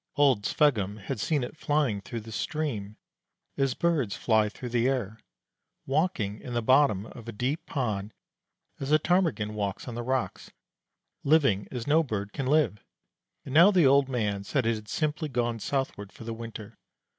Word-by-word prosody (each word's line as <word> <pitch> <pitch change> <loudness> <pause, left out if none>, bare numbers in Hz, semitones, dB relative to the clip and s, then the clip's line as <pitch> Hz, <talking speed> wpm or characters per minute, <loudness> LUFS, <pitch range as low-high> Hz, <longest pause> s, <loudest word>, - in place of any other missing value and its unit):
Old 135 -8 +3
Sveggum 105 -9 +2
had 110 +4 -5
seen 145 +4 0
it 125 - -6
flying 145 -9 0
through 115 +2 -6
the 110 +1 -10
stream, 110 -7 -3 0.6
as 135 -2 0
birds 150 - +1
fly 110 -2 +2
through 125 +3 -7
the 120 +1 +2
air, 115 -5 -2 0.7
walking 135 - 0
in 120 - -6
the 120 - 0
bottom 130 -5 +4
of 115 0 -11
a - - -4
deep 130 +9 -2
pond 110 -7 -2 0.7
as 135 +1 -3
a 155 - +7
Ptarmigan 155 - +1
walks 100 0 -3
on 120 - -5
the 120 - -4
rocks, 130 +1 -2 0.7
living 140 -10 +3
as 125 -3 -5
no 155 +3 +4
bird 105 -8 -4
can 135 -2 -3
live; 130 - +2 0.6
and 130 - -6
now 170 +6 +8
the 180 -6 +4
old 135 0 +5
man 105 -6 -1
said 130 +4 0
it 115 - +3
had 110 -1 -7
simply 155 0 -1
gone 120 -3 -1
southward 110 -5 -3
for - - -12
the 115 0 -4
winter. 115 -1 -9
120 Hz, 175 wpm, -28 LUFS, 105-145 Hz, 0.7 s, now